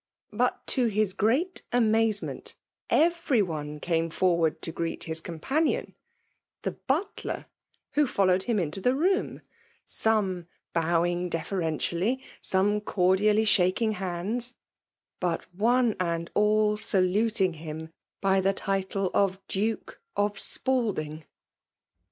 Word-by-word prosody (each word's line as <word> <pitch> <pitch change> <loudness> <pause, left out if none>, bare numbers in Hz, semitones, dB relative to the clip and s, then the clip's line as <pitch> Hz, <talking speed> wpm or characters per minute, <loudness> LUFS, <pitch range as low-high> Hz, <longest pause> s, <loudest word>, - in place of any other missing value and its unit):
But^ 245 +4 +2
to 250 -2 +2
his 210 -3 +1
great 275 - +1
amazement, 225 -3 +1 0.3
every 330 -8 +3
one 150 -4 -5
came 165 0 0
forward 170 -2 +1
to 165 - -1
greet 165 0 -3
his 160 0 -2
companion— 265 - -1 0.7
fAe - - -2
bwUer, 315 +9 -2 0.5
who 295 -1 +2
followed 185 -5 +2
him 230 +1 -1
into 175 +1 -2
the 250 +5 +2
room; 375 +7 0 0.4
some 195 -6 +1 0.3
bowing 175 +2 +1
deferentidly 170 - -1 0.2
—seme 205 +2 +2
cordially 205 +3 +3
shaking 205 +2 +3
hands 210 +6 -1 0.3
— - - -64
but 175 -2 0
one 235 +3 +2
and 170 -2 -2
all 210 0 +3
saluting 195 0 +2
him 160 0 -7 0.3
by 195 -1 +3
the 195 +1 +2
title 195 -1 -1
of 195 -1 +2
Duke 225 - -3 0.2
of 205 0 +2
Spal 250 -5 +2
ding. 155 0 -6
195 Hz, 115 wpm, -27 LUFS, 175-225 Hz, 0.7 s, every